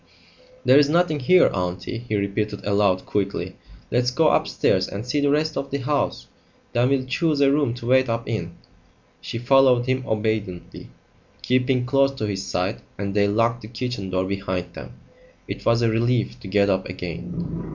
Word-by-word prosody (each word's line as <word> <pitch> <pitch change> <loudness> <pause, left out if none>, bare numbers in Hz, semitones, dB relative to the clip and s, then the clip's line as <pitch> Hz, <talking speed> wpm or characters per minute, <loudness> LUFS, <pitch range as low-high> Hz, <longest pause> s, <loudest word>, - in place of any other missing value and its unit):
"There's 145 0 +6
nothing 170 -2 +2
here, 180 +8 +5
aunty," 90 +5 -3
he 110 - 0
repeated 105 +1 -2
aloud 100 -2 +2
quickly. 100 -1 -2 0.4
"Let's 125 0 +2
go 150 +5 +3
upstairs - - +1
and 100 +4 -6
see 145 +4 0
the 145 - +2
rest 155 +2 +1
of 140 - -3
the 140 - -2
house. 140 +2 -1 0.5
Then 120 +2 +2
we'll 135 -1 +1
choose 150 +3 0
a 140 -1 +4
room 140 -5 +1
to 120 - -9
wait 130 +1 +3
up 115 0 -2
in." 85 -7 -4 0.7
She - - -5
followed 125 0 +4
him 130 0 0
obediently, 105 -5 -3 0.5
keeping 125 0 +1
close 135 +1 +3
to 130 -6 -4
his 100 -2 -3
side, 95 +1 -2 0.2
and 100 0 -3
they 100 0 +3
locked 115 +3 +1
the 105 - -9
kitchen 120 -4 -4
door 95 0 0
behind 95 -2 -3
them. - - -9 0.5
It - - -6
was 115 0 +3
a 115 - +3
relief 115 +1 0
to - - -10
get 100 +1 +2
up 95 -2 0
again. 165 - -6
115 Hz, 175 wpm, -23 LUFS, 100-135 Hz, 0.7 s, There's